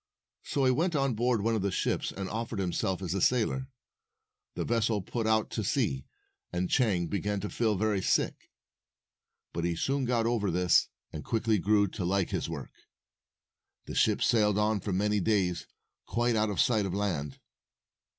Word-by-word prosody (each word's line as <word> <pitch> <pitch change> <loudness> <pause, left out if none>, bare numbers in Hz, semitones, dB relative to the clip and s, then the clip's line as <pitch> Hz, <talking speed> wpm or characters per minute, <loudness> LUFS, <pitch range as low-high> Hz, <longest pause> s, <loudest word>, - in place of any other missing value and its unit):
So 140 -2 0
he 130 - +5
went 165 +6 +1
on 135 -3 +1
board 120 -1 +1
one 115 +1 +1
of 110 - 0
the 100 - 0
ships - - -1
and 95 -1 -5
offered 115 +1 -4
himself 95 0 -1
as 90 -1 -2
a 95 - -1
sailor. 125 +3 +1 0.9
The - - -2
vessel 110 -3 +1
put 115 +3 -2
out 110 0 +2
to - - -2
sea, 65 -1 0 0.4
and 90 0 -2
Chang 105 -10 +2
began 100 +3 -2
to 105 - -4
feel 110 -3 +1
very 105 0 0
sick. - - 0 1.0
But 85 - -2
he 85 0 0
soon 135 +9 0
got 120 -2 +1
over 115 -4 +1
this, 90 0 +3 0.2
and 75 - -6
quickly 110 -2 +1
grew 100 +2 +3
to 95 - -5
like 95 +1 0
his - - -2
work. - - -6 1.1
The - - -7
ship - - +2
sailed 105 -3 +3
on 105 0 +2
for 100 - -4
many 105 +3 +1
days, 95 -4 0 0.4
quite 120 0 +1
out 110 0 +2
of 100 - -3
sight 110 -6 +3
of 95 - -3
land. 80 -9 -2
105 Hz, 180 wpm, -29 LUFS, 95-115 Hz, 1.1 s, he